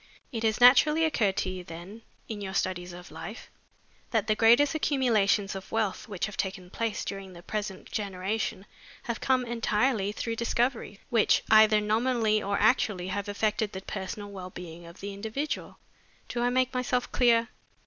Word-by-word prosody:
It 225 - -3
has 220 0 +1
naturally 300 +6 +6
occurred 210 -11 +1
to 185 - 0
you, 185 -1 -6
then, 175 +6 -10 0.3
in 215 -2 -5
your 190 -1 -5
studies 180 -2 -1
of 175 +1 -11
life, - - -8 0.6
that 220 -3 +1
the 215 - +2
greatest 235 +7 +5
accumulations 230 -10 +2
of 190 -1 -8
wealth 220 -2 -1
which 195 -3 -2
have 215 - -7
taken 190 -2 -4
place 230 -2 -2
during 195 -2 -6
the 170 0 -12
present 205 -2 -5
generation 200 0 -3 0.4
have 235 -2 -4
come 255 -1 +2
entirely 230 -2 +1
through 230 +2 -4
discoveries, 235 -2 -1
which 230 -3 +3
either 215 -1 +7
nominally 220 0 +1
or 200 0 -1
actually 205 -4 +2
have 200 +1 -3
affected 210 0 0
the 190 - -5
personal 200 +1 -6
well 185 -2 -7
being 175 -1 -10
of 170 - -13
the 200 0 -5
individual. 220 +9 -4 0.5
Do 240 - -2
I 245 - +2
make 255 +1 +1
myself 250 0 -1
clear? 235 -2 +3
215 Hz, 170 wpm, -28 LUFS, 195-235 Hz, 0.6 s, either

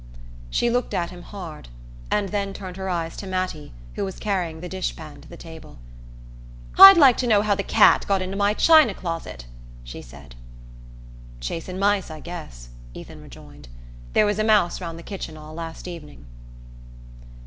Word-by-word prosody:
She 235 - 0
looked 245 0 -1
at 170 -1 -2
him 180 -1 -11
hard, 175 - -10 0.4
and 205 -2 0
then 200 -1 -3
turned 185 -2 -8
her 190 0 -5
eyes 165 -2 -3
to 195 - -7
Mattie, 185 -5 -4 0.2
who - - -4
was 190 -1 -5
carrying 180 -6 -3
the 180 - -7
dish 185 +1 -4
pan 155 -2 -11
to - - -16
the - - -12
table. 160 - -12 1.0
"I'd 390 -1 +11
like 270 -6 +6
to 250 - -1
know 210 -3 +3
how 210 -1 +2
the 200 - -2
cat - - +4
got 195 -1 +1
into 185 +1 -5
my 205 +1 +1
china 310 -10 +5
closet"' 165 - -6 0.4
she - - -9
said. 65 0 -14 1.1
"Chasin' 165 - -5
mice, 200 -1 +1
I 155 -1 -8
guess," 150 - -10 0.3
Ethan - - -11
rejoined. - - -14 0.5
"There 215 - +4
was 205 0 -1
a - - +2
mouse 210 -5 +2
round 165 -2 -6
the 170 - -11
kitchen 175 -5 -7
all 155 0 -11
last 165 +1 -8
evening." 150 - -10
185 Hz, 175 wpm, -23 LUFS, 160-205 Hz, 1.1 s, I'd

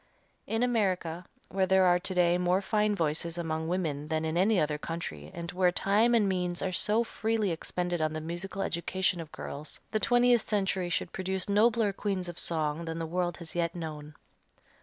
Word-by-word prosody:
In 225 +2 0
America 185 -8 0 0.2
where 190 0 +1
there 190 0 +5
are 180 0 +4
to 185 +1 -4
day 175 0 +3
more 180 +1 +2
fine 210 +1 +1
voices 165 0 -1
among 160 -1 -2
women 160 -5 -2
than 160 0 -1
in 160 0 -2
any 195 +3 +3
other 150 -1 0
country 75 - -5
and 170 0 -6
where 180 0 +3
time 210 +6 +3
and 215 -3 +3
means 180 -2 -1
are 190 - -1
so 210 +5 +2
freely 220 -3 -1
expended 175 +1 -2
on 155 0 +1
the 155 - -3
musical 175 +5 -4
education 180 +1 -1
of 155 -2 -10
girls, 150 +2 -7
the 215 - +1
twentieth 245 -1 +4
century 190 -3 0
should - - -2
produce 190 0 -2
nobler 215 0 +3
queens 195 -2 -2
of 175 -1 -4
song 160 0 +2
than 165 0 -4
the 165 - -2
world 175 +1 -1
has 170 -2 -7
yet 170 0 -1
known. 155 -3 -6
180 Hz, 190 wpm, -29 LUFS, 165-195 Hz, 0.2 s, there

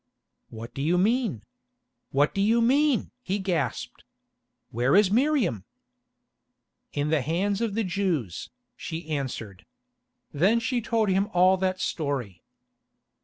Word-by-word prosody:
"What 115 +2 -9
do 135 - -5
you 165 +5 +2
mean? 215 - +1 0.7
What 145 +2 +2
do 195 - 0
you 225 +4 +3
mean?" 270 +3 +2
he 195 -4 -2
gasped. 185 -5 -3 0.7
"Where 125 +6 +2
is 200 -1 +5
Miriam?" 240 - +1 1.3
"In 145 +1 -1
the 155 -3 +2
hands 190 - -1
of 225 -4 -1
the 225 - +1
Jews," 175 - -2 0.3
she 165 0 -6
answered. 120 -9 -4 0.7
Then 195 +11 +3
she 240 +1 -1
told 225 -3 0
him 190 +2 +2
all 185 +2 +5
that 185 0 -1
story. 135 - -3
185 Hz, 125 wpm, -26 LUFS, 145-220 Hz, 1.3 s, is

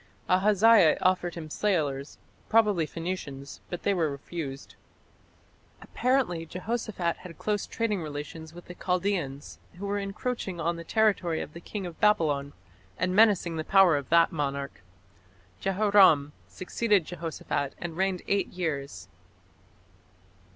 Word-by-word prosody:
Ahaziah 200 -1 +5
offered 180 -1 +1
him 155 -3 -8
sailors 150 -9 -1 0.3
probably 210 -8 +3
Phoenicians 150 -6 -6
but 175 - -6
they 200 - +2
were 165 -5 +1
refused. 140 0 -7 1.1
Apparently 250 -10 0
Jehoshaphat 185 0 -3
had 175 -3 -11
close 210 -1 -2
trading 215 -5 -1
relations 155 +1 -7
with 175 +1 -12
the 180 - -9
Chaldaeans, 180 -7 -2 0.2
who 190 +3 -7
were 205 0 -1
encroaching 200 -2 -4
on 170 +1 0
the 170 - -7
territory 190 -4 +1
of 150 - -6
the 170 - -10
king 200 +2 -6
of 175 -2 -8
Babylon, 150 -9 +2 0.4
and 180 +1 0
menacing 195 -6 +4
the 155 - -2
power 190 -2 +5
of 140 -2 -4
that 170 0 +5
monarch. 140 -5 -3 0.8
Jehoram 190 -7 +4
succeeded 205 -1 0
Jehoshaphat 160 -5 -4
and 175 -2 -6
reigned 190 0 -1
eight 200 0 +1
years. 140 - -4
175 Hz, 130 wpm, -28 LUFS, 155-200 Hz, 1.1 s, Ahaziah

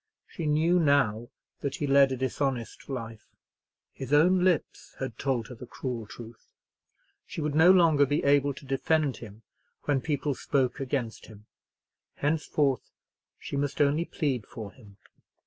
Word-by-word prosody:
She 165 - -5
knew 160 +4 +3
now 135 -7 +2 0.3
that 140 -1 -3
he 145 - -2
led 140 -1 +5
a 130 - -2
dishonest 130 -1 -3
life. 115 -4 -6 0.6
His 135 0 -8
own 180 +5 +4
lips 180 -5 -1
had 130 -4 -5
told 130 -4 -1
her - - -7
the 125 +1 -11
cruel 120 -4 -5
truth. 115 +1 -12 0.8
She - - -7
would 150 -1 -1
no 160 +4 +6
longer 165 -6 +5
be 145 +3 0
able 140 0 +3
to 140 - -12
defend 140 +1 0
him 110 -1 -12 0.4
when 140 -3 +1
people 145 -1 -1
spoke 130 0 -1
against 130 -4 -3
him. 105 -1 -15 0.7
Henceforth 145 -2 0 0.5
she - - -7
must 140 0 -2
only 150 +3 +2
plead 135 -11 -2
for 105 -3 -8
him. 105 -6 -18
140 Hz, 150 wpm, -28 LUFS, 120-150 Hz, 0.8 s, no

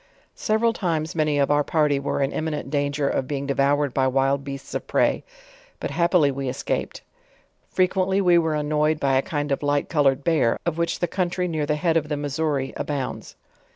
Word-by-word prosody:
Several 225 +2 +1
times, 165 -6 -2
many 150 -2 +1
of 140 0 +2
our 145 0 +3
party 150 -2 +1
were 140 0 -1
in 135 - -1
imrnifient 150 -4 -3
dan 145 -1 0
ger 140 -1 -1
of 135 - -1
being 140 -1 -3
devoured 140 0 +1
by 130 -1 +2
wild 135 +1 +1
beasts 140 -1 -7
of - - -4
prey; - - +1 0.6
but - - -4
happily 170 -4 +3
we 135 -1 -3
escaped. 130 - -3 0.7
.Frequently 185 +1 +1
we 175 -3 +5
were 160 -2 0
annoyed 150 +1 +1
by 135 -2 +2
a 130 - +4
kind 145 -3 -3
of 140 - 0
light 145 0 0
colored 140 -3 +2
bear, 155 -8 +2
of 170 -1 -2
which 170 - -1
the 175 - +2
country 180 +1 -1
near 155 -3 -2
the 150 - +1
head 165 +1 +1
of 150 -2 -2
the 150 - -1
Mis 145 +1 -4
souri, 145 -4 -1
abounds. 140 -3 -4
150 Hz, 200 wpm, -23 LUFS, 140-165 Hz, 0.7 s, we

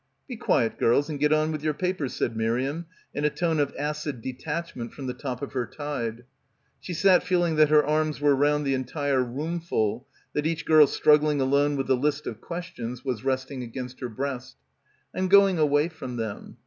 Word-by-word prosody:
"Be 255 - -6
quiet, 115 - +1
girls, 140 +6 +3
and 145 - -4
get 150 +1 +2
on 155 +1 +2
with 155 -1 -4
your 155 -1 0
papers," 180 -6 -2
said - - -1
Miriam 130 +9 -1 0.3
in 145 - -3
a 150 - +4
tone 165 0 0
of 145 -1 +1
acid 150 -2 -3
detachment 130 +1 -5
from 140 - -7
the 125 - -3
top 130 +1 -5
of 140 - -6
her 125 -3 -1
tide. 120 -6 -4 0.6
She - - -8
sat 185 +1 +5
feeling 175 -3 +1
that 155 -1 +5
her 150 -1 +5
arms 155 0 0
were 145 -1 +4
round 145 +1 +2
the 135 - +1
entire 135 +1 0
roomful, 135 -4 -2 0.3
that 150 +1 0
each 165 -1 -2
girl 155 -2 +7
struggling 150 0 +3
alone 140 +2 +2
with 135 -1 -1
the 130 - +3
list 145 +3 -1
of 110 -1 -6
questions 145 -8 -6
was 125 -5 -2
resting 130 0 -2
against 125 +1 -7
her 125 - -4
breast. 130 +2 -5 0.6
"I'm 185 - -1
going 195 -2 +5
away 145 0 +3
from 155 -7 -7
them. 110 -3 -5
145 Hz, 195 wpm, -26 LUFS, 130-155 Hz, 0.6 s, girl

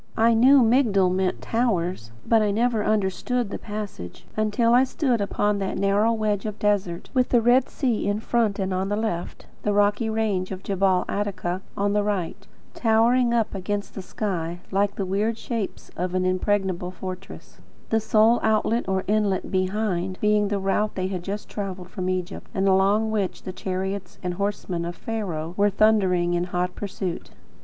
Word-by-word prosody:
I 230 +1 +5
knew 255 +4 +6
Migdol 220 -6 +3
meant 185 0 -1
"towers," 180 - -1
but 225 -1 +4
I 210 - +2
never 225 +1 +1
understood 215 +3 0
the - - -4
passage, 205 - -7
until 215 +2 +2
I 250 +2 +6
stood 260 -3 0
upon 205 0 0
that 195 -1 -2
narrow 200 +3 +2
wedge 215 -2 -1
of 210 0 -5
desert, 195 -5 -1
with 255 -2 +2
the 240 - +4
Red 245 +3 +3
Sea 245 -8 -1
in 205 +1 0
front 220 -2 0
and 190 -1 -1
on 190 +1 -1
the 205 - 0
left; 210 -6 -3 0.2
the 210 - 0
rocky 205 +2 +2
range 210 -4 -1
of 190 0 -6
Gebel 190 -1 +1
Attaka 195 -3 -2 0.2
on 200 0 +1
the 210 - +2
right, 200 -5 -3 0.3
towering 235 +2 +3
up 230 -2 +1
against 200 +1 -3
the 195 - -6
sky, 175 -4 -3
like 200 +1 +1
the 195 - -2
weird 210 +4 0
shapes 230 -4 -5
of 180 +1 -2
an 185 0 +1
impregnable 185 -1 0
fortress; 185 +2 -9 0.3
the 225 - +4
sole 220 +2 +4
outlet 220 +1 +1
or 190 0 0
inlet 205 -2 0
behind, 185 -1 -1
being 210 -1 +3
the 205 0 -1
route 195 +2 0
they 185 0 -1
had 185 -2 -3
just 200 +3 -5
travelled 185 -3 -6
from 185 0 -3
Egypt, 185 0 -4
and 195 0 +1
along 200 +3 +3
which 205 -4 -2
the 185 - -6
chariots 190 0 -4
and 180 0 -2
horsemen 190 -2 -2
of 170 +1 -4
Pharaoh 175 -8 -4
were 205 0 +4
then 200 - -12
thundering 185 -5 +3
in 175 0 0
hot 180 0 -2
pursuit. 190 -3 -5
200 Hz, 180 wpm, -24 LUFS, 185-220 Hz, 0.3 s, knew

